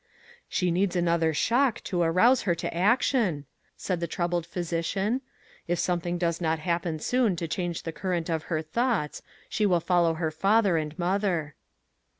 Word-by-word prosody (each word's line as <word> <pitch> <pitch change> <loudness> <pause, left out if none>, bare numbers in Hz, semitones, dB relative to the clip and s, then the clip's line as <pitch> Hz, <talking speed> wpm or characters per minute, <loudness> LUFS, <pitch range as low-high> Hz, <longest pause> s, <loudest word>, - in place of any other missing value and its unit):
" - - -23
She 180 -1 0
needs 185 +2 +1
another 170 -2 +2
shock 240 - +1
to 175 -2 -1
arouse 185 +10 +4
her 170 - +3
to 170 - -4
action," 200 - +2 0.3
said 180 -3 -2
the 170 - -2
troubled 175 0 -2
physician; 180 +7 -1 0.2
" - - -28 0.2
if 175 +1 0
some 175 +1 0
thing 175 +1 -3
does 170 0 -1
not 160 -1 +1
happen 170 0 -1
soon 230 +4 +1
to 165 0 -3
change 175 0 -3
the 165 - -4
cur 185 +3 -5
rent 170 -3 -1
of 160 -2 -2
her 160 -2 -2
thoughts, 210 - -1 0.3
she 210 -1 +1
will 180 -3 +3
follow 170 -1 +2
her 160 -1 -1
father 195 +3 +3
and 155 0 -2
mother." 175 -4 0
175 Hz, 180 wpm, -27 LUFS, 165-195 Hz, 0.3 s, arouse